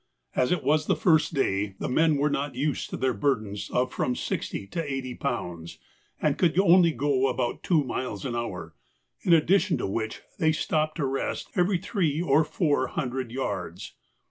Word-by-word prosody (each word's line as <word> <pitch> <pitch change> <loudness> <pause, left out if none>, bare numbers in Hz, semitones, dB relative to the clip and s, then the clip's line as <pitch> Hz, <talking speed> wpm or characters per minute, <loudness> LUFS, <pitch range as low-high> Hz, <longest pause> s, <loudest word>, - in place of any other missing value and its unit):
As 125 - +2
it 180 -4 +1
was 155 +1 +2
the - - +3
first 160 -2 +3
day, 100 -6 0
the - - -3
men 155 +3 +3
were 145 +1 +1
not 140 -2 -2
used 145 +2 -1
to - - -4
their 130 -1 +1
burdens 105 -4 -1
of 125 +1 0
from 125 - 0
sixty - - -3
to 165 - -3
eighty 130 -2 -3
pounds, 90 -12 -4 0.4
and - - 0
could 175 0 +3
only 180 -2 +6
go 140 -3 +1
about 125 -1 -2
two 160 -5 +2
miles 125 -6 -4
an 120 - -2
hour, 90 -9 -4 0.5
in 180 - 0
addition 170 +4 +4
to - - -2
which 110 +3 -3 0.2
they 155 -1 +3
stopped 155 0 0
to 150 - 0
rest 135 0 -2
every 180 +1 +2
three 170 -5 -1
or 155 -2 +3
four 145 -6 0
hundred 125 -1 -3
yards. 95 -7 -4
135 Hz, 180 wpm, -27 LUFS, 120-155 Hz, 0.5 s, only